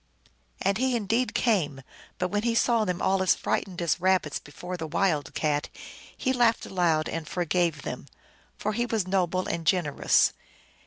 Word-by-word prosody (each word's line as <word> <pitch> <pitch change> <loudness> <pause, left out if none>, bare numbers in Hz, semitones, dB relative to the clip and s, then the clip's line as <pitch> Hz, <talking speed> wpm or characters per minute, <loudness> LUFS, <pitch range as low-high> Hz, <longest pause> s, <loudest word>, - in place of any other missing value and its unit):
And 195 +2 +1
he 260 -1 +1
indeed 230 +3 0
came; 155 - +1 0.3
but 180 - -1
when 205 +2 0
he 230 +1 0
saw 230 -2 +3
them 180 -2 -2
all 190 0 +2
as 185 - +4
frightened 180 -2 -2
as 170 0 0
rabbits 185 -5 +2
before 175 +5 -8
the 165 -2 -5
wild 155 -3 0
cat, 150 -1 0 0.5
he 260 - 0
laughed 240 -2 +2
aloud 165 -4 +1
and 165 -2 -4
forgave 170 -3 0
them, - - -6 0.5
for 215 - -2
he 240 +3 0
was 220 -5 0
noble 185 -1 0
and 170 - -3
gen 175 +1 +2
erous. 145 - +3
185 Hz, 170 wpm, -27 LUFS, 165-215 Hz, 0.5 s, as